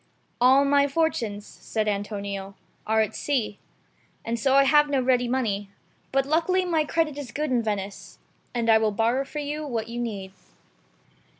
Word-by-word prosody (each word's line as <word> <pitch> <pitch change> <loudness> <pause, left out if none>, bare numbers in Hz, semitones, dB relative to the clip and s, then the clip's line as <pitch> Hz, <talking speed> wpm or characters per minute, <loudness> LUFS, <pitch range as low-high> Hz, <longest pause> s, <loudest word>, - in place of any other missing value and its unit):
"All 265 +3 +6
my 280 0 +4
fortunes," 240 -9 -1
said 215 -1 -4
Antonio, 200 -1 -3 0.3
"are 220 0 +3
at 215 - -2
sea, 245 -8 -1 0.7
and 230 0 -2
so 265 +3 +2
I 275 - +7
have 295 +1 +4
no 280 -2 +2
ready 250 -1 +2
money; 215 -6 -1 0.4
but 270 0 +2
luckily 340 +5 +1
my 320 -3 +1
credit 300 -2 -1
is 265 -5 -7
good 300 +1 -2
in 245 -2 +2
Venice, 205 -3 -5 0.3
and 235 -2 -2
I 220 -1 +6
will 220 -1 +2
borrow 230 +5 +1
for 300 - -9
you 295 +1 -3
what 230 -4 -3
you 235 +1 -5
need. 200 -5 -4
245 Hz, 170 wpm, -25 LUFS, 215-285 Hz, 0.7 s, I